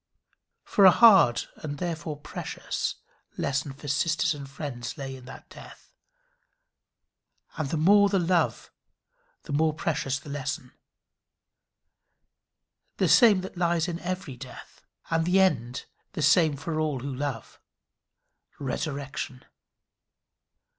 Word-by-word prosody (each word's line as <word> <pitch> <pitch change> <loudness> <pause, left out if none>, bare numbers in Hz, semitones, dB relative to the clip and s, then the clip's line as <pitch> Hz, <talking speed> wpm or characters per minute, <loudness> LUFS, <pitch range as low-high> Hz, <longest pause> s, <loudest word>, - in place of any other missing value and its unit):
For 200 - +2
a - - +11
hard 190 - +6
and 145 -2 -6
therefore 165 -3 -4
precious 145 - -4 0.4
lesson 140 0 -1
for 145 +2 -11
sisters 160 +3 +1
and 140 -2 -9
friends 135 -2 -6
lay 135 -2 -6
in 130 -1 -13
that 130 - -12
death, - - -14 1.6
and 155 -5 -3
the 160 - -1
more 200 +6 +5
the 195 - +1
love 175 -1 0 0.7
the 145 - -6
more 155 +1 +2
precious 145 -4 -1
the 140 - -13
lesson 140 -1 -4 2.3
the - - +2
same 215 -7 +6
that 190 -1 -9
lies 170 -1 +1
in 170 -1 -4
every 180 -7 -5
death; 130 -1 -12 0.3
and 165 0 +2
the 180 +3 +3
end 130 -10 +1 0.3
the 155 - -3
same 155 0 +4
for 155 +2 -3
all 150 -5 -1
who 140 +1 -4
love 130 -4 -5 1.0
resurrection. 135 -2 -5
150 Hz, 120 wpm, -27 LUFS, 135-175 Hz, 2.3 s, a